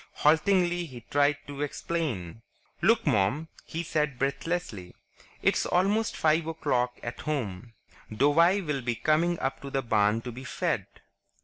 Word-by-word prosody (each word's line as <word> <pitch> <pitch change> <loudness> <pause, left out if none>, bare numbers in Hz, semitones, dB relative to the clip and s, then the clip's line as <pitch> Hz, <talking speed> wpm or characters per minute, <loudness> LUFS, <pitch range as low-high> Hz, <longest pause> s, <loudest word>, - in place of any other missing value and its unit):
Haltingly, 175 +2 +2
he 125 -4 -10
tried 145 +1 +3
to 145 0 -7
explain. 135 - -3 0.4
"Look, 230 +1 +3
Mom," 110 +11 +1 0.2
he 165 +1 -4
said 150 -4 -1
breathlessly. 135 - -3 0.5
"It's - - +2
almost 205 +5 +1
five 160 +1 +2
o'clock 125 -6 -1
at 120 0 -5
home. 115 -7 -4 0.4
Douwie 165 - +4
will 145 -3 -1
be 120 -1 -1
coming 165 +7 +2
up 135 - -2
to 140 - -6
the 135 0 -1
barn 110 -1 +2
to 125 - -6
be 125 +3 -9
fed. - - -2
145 Hz, 140 wpm, -28 LUFS, 120-165 Hz, 0.5 s, Douwie